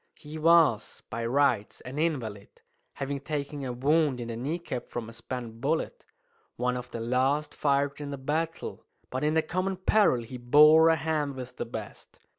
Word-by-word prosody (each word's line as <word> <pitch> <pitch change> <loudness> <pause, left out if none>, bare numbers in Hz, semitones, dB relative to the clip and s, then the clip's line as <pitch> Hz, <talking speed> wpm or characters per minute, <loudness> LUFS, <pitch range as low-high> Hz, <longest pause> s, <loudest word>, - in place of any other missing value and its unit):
He 155 +1 -9
was, 160 -8 +3
by 115 +1 -2
rights, 130 -5 +1
an 130 +4 -6
invalid, 120 -11 -3 0.3
having 140 0 -3
taken 145 0 -4
a 130 - -3
wound 140 +2 +2
in 120 -1 -5
the 115 - -4
kneecap 135 +1 -4
from 120 -2 -5
a 115 - -10
spent 115 -1 -7
bullet, 160 - -2 0.5
one 125 0 0
of 125 -1 -6
the 115 - -6
last 130 +6 0
fired 140 0 0
in 145 - -5
the 140 - -4
battle; 160 +5 -3 0.3
but 130 +2 -2
in 155 +1 +2
the 160 - +3
common 185 +4 -2
peril 185 - +3
he 125 +3 -8
bore 150 +6 +7
a 165 - +5
hand 150 -2 -1
with 125 -1 -8
the - - -3
best. 110 -3 -9
140 Hz, 180 wpm, -28 LUFS, 125-155 Hz, 0.5 s, bore